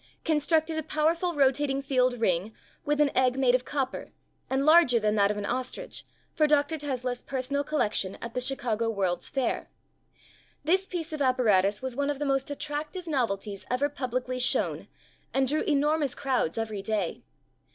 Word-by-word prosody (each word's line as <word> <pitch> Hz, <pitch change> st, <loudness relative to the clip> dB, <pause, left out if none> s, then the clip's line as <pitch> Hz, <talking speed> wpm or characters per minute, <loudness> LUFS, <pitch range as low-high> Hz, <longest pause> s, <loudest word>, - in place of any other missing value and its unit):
constructed 315 Hz, +1 st, +1 dB
a -, -, -1 dB
powerful 320 Hz, +3 st, 0 dB
rotating 275 Hz, 0 st, +2 dB
field 255 Hz, -3 st, +1 dB
ring 195 Hz, 0 st, 0 dB, 0.3 s
with 295 Hz, 0 st, 0 dB
an 295 Hz, -2 st, +3 dB
egg 255 Hz, 0 st, +3 dB
made 260 Hz, -2 st, +3 dB
of 255 Hz, 0 st, +1 dB
copper, 270 Hz, -3 st, -3 dB, 0.4 s
and 265 Hz, +1 st, +1 dB
larger 310 Hz, -7 st, +6 dB
than 210 Hz, -1 st, +1 dB
that 200 Hz, -2 st, +3 dB
of 210 Hz, -, -1 dB
an 205 Hz, -, -3 dB
ostrich, 255 Hz, +3 st, -4 dB, 0.3 s
for 305 Hz, -, +3 dB
Dr. 295 Hz, +1 st, +2 dB
Tesla's 255 Hz, -3 st, -3 dB
personal 275 Hz, +2 st, -2 dB
collection 210 Hz, -10 st, -1 dB
at 235 Hz, 0 st, -7 dB
the 250 Hz, -, -1 dB
Chicago 235 Hz, -4 st, -1 dB
World's 190 Hz, -5 st, -1 dB
Fair. 270 Hz, -3 st, -1 dB, 0.9 s
This 375 Hz, +5 st, +2 dB
piece 335 Hz, -3 st, -4 dB
of 305 Hz, -, -4 dB
apparatus 215 Hz, -6 st, +3 dB
was 260 Hz, -2 st, -3 dB
one 285 Hz, +1 st, 0 dB
of 290 Hz, -, -1 dB
the 295 Hz, -, -2 dB
most 270 Hz, 0 st, 0 dB
attractive 300 Hz, +5 st, -4 dB
novelties 210 Hz, -, -2 dB
ever 265 Hz, +4 st, +1 dB
publicly 255 Hz, -2 st, -3 dB
shown 250 Hz, -, 0 dB, 0.5 s
and 265 Hz, 0 st, +3 dB
drew 300 Hz, +4 st, +1 dB
enormous 295 Hz, -1 st, +1 dB
crowds 255 Hz, -, -1 dB
every 220 Hz, -3 st, -3 dB
day. 200 Hz, -3 st, -2 dB
265 Hz, 165 wpm, -28 LUFS, 235-295 Hz, 0.9 s, larger